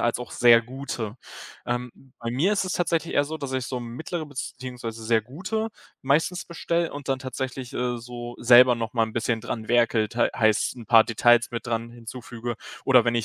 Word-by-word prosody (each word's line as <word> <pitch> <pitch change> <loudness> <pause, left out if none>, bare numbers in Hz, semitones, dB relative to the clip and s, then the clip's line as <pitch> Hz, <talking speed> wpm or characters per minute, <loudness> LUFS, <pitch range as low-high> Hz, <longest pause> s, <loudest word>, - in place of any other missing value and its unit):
als 120 0 +1
auch 125 - -8
sehr 120 -1 +6
gute. 120 -3 -5 0.5
Ähm, 120 +1 -2 0.3
bei 115 -1 -4
mir 160 - +2
ist 195 - +1
es 185 - -3
tatsächlich 170 -2 0
eher 145 - +4
so, 160 +2 -5
dass 140 -3 -5
ich 130 -2 -1
so 125 -1 -4
mittlere 155 +7 -5
beziehungsweise 125 -5 -6
sehr 110 -1 +2
gute 190 - -3 0.3
meistens 150 +5 +1
bestelle 170 0 -1
und 145 -1 -8
dann 135 -1 +1
tatsächlich, 130 -1 -5
äh, 125 0 -1
so 120 0 -8
selber 125 +1 +7
noch 115 -2 -4
mal 115 -2 +2
'n 110 - -10
bisschen 115 -1 0
dran 110 0 -5
werkle, 115 -2 +3
tei 120 - +2
heißt 110 +2 +2
'n 120 - -9
paar 115 -2 +7
Details 120 +1 +4
mit 115 -1 -5
dran 115 -1 -2
hinzufüge, 120 0 -7 0.3
oder 125 -3 +6
wenn 120 - +2
ich 115 -2 +1
120 Hz, 200 wpm, -25 LUFS, 115-135 Hz, 0.5 s, selber